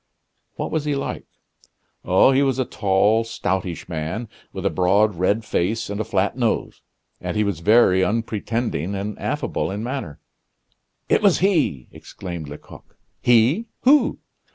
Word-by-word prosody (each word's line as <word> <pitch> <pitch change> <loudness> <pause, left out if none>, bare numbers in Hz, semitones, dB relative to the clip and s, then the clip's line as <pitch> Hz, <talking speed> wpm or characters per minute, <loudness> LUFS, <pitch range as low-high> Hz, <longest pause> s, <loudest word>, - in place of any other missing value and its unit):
"What - - -4
was 155 -2 -1
he 145 -1 0
like?" 140 - -4 0.8
"Oh, 95 +8 +5
he 135 +1 +3
was 135 -2 +1
a 130 - 0
tall, 105 +2 +2
stoutish 95 -6 -3
man, 90 +8 -4 0.2
with - - -6
a - - +2
broad, 100 +4 +3
red 100 +5 0
face, 105 +3 -1
and 100 +1 -2
a - - 0
flat 100 0 0
nose; 120 -3 -1 0.4
and - - -4
he 105 - +3
was 100 -6 -2
very 95 -1 +4
unpretending 110 -3 -2
and 100 +1 -4
affable - - -2
in 100 +3 -4
manner. 120 - -5 0.9
"It - - +3
was 200 -4 +4
he!" 160 - +1
exclaimed 85 -5 -8
Lecoq. 75 - -13 0.2
"He! 125 - +3
Who?" 285 +3 +4
105 Hz, 150 wpm, -22 LUFS, 95-120 Hz, 0.9 s, Oh